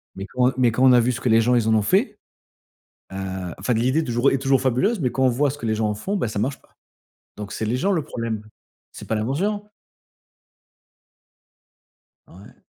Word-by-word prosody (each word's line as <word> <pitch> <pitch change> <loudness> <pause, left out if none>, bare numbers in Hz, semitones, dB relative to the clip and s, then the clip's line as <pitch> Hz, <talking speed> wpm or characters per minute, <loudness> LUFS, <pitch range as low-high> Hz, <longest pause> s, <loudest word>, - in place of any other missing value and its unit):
Mais 95 - -6
quand, 125 +2 +2
heu, - - -5
mais 125 -2 +3
quand 125 +4 0
on 125 - +7
a 125 - +6
vu 120 +2 +2
ce 120 - -4
que 125 - 0
les 115 0 +5
gens 125 +2 +2
ils 115 -2 +1
en 110 - +3
ont 110 - +3
fait, 210 - +1 0.9
heu, - - -8 0.4
enfin 105 +6 -1
l'idée 130 +7 +1
est - - 0
toujours, 120 0 +2
heu, - - -1
est 135 - +2
toujours 135 0 +1
fabuleuse, 135 - +1
mais 125 -3 0
quand 130 - -1
on - - +5
voit 140 +4 +1
ce 145 - -6
que 130 - -7
les 110 -1 0
gens 110 0 0
en 105 - -2
font, 195 - -3
bah 185 - -1
ça 105 -2 -4
marche 130 +6 -2
pas. - - -30 0.6
Donc 105 -1 -7
c'est 110 - -3
les 115 +4 -1
gens 195 +10 0
le 175 -5 +1
problème. 115 -4 -4 0.5
C'est - - -11
pas 110 - -1
l'invention. 180 - -1 2.6
Ouais. 95 +4 -16
125 Hz, 230 wpm, -22 LUFS, 110-140 Hz, 2.6 s, on